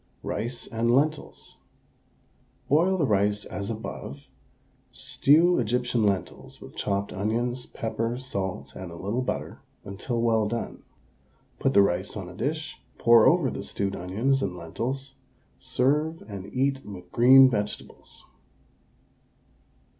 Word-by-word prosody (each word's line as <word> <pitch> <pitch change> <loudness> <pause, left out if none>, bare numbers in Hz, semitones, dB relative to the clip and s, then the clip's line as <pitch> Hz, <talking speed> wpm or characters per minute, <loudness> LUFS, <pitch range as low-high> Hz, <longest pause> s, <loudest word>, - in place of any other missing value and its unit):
RICE 120 +3 -3
AND 115 +1 -1
LENTILS. 145 +5 0 1.1
Boil 170 +7 +3
the 160 - +2
rice 105 -2 +1
as 100 +2 -5
above; 70 -10 -6 0.7
stew 165 +4 +3
Egyptian 120 0 0
lentils 100 -2 -2
with - - -12
chopped 100 0 -2
onions, 120 +5 -1
pepper, 115 +1 -3
salt, 95 - -4
and 95 -2 -7
a - - -9
little 105 +8 -2
butter, 125 - -4 0.2
until 100 +5 -3
well 115 -2 +2
done. 115 +2 -4 0.8
Put 135 - +1
the 100 - +8
rice 95 +2 -1
on 95 -3 -6
a 90 - -9
dish, 155 +8 -3 0.2
pour 115 -1 +6
over 165 -6 +3
the - - -5
stewed 100 -1 -3
onions 115 +10 0
and 90 - -2
lentils, 130 +11 -4 0.5
serve, 145 +6 0
and 100 -1 -8
eat 135 +1 0
with 90 -3 -10
green 130 +3 +8
vegetables. 105 -4 -4
115 Hz, 125 wpm, -26 LUFS, 100-135 Hz, 1.1 s, the